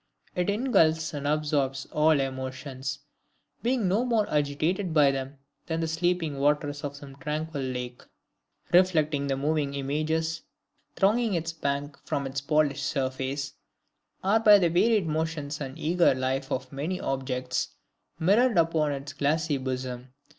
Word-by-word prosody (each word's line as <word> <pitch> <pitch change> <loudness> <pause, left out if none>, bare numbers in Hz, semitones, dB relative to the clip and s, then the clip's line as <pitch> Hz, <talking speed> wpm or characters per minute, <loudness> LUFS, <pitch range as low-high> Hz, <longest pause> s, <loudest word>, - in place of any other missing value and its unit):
It 180 -2 -1
ingulfs 190 -9 +2
and 145 -1 -3
absorbs 145 -3 0
all 155 -1 +4
emotions, 130 0 -4 0.6
being 240 -4 +1
no 200 +6 +2
more 230 -4 +1
agitated 155 +5 0
by 145 -2 +6
them 135 +1 -5 0.3
than 165 -1 -1
the 165 - 0
sleeping 165 -3 0
waters 145 0 +1
of 145 -1 -4
some 140 -1 -11
tranquil 155 -1 -3
lake, 125 -1 -4 0.7
reflecting 155 -6 +3
the 135 -1 0
moving 145 0 0
images 155 +4 -1 0.5
thronging 215 +1 +2
its 165 0 -2
banks 140 -2 -3
from 140 - -2
its 135 +1 -3
polished 145 -1 +1
surface, 135 0 -2 0.7
are 205 +4 +4
by 210 -2 +8
the 175 -4 +2
varied 210 +3 +3
motions 155 -2 -2
and 135 +1 -5
eager 170 -2 +3
life 130 +1 -2
of 130 0 -3
the - - -10
many 170 +6 -2
objects 130 -1 -2 0.4
mirrored 205 +7 +3
upon 160 -3 +3
its 140 +1 -6
glassy 150 +1 +1
bosom. 130 -1 -5
150 Hz, 140 wpm, -27 LUFS, 135-165 Hz, 0.7 s, by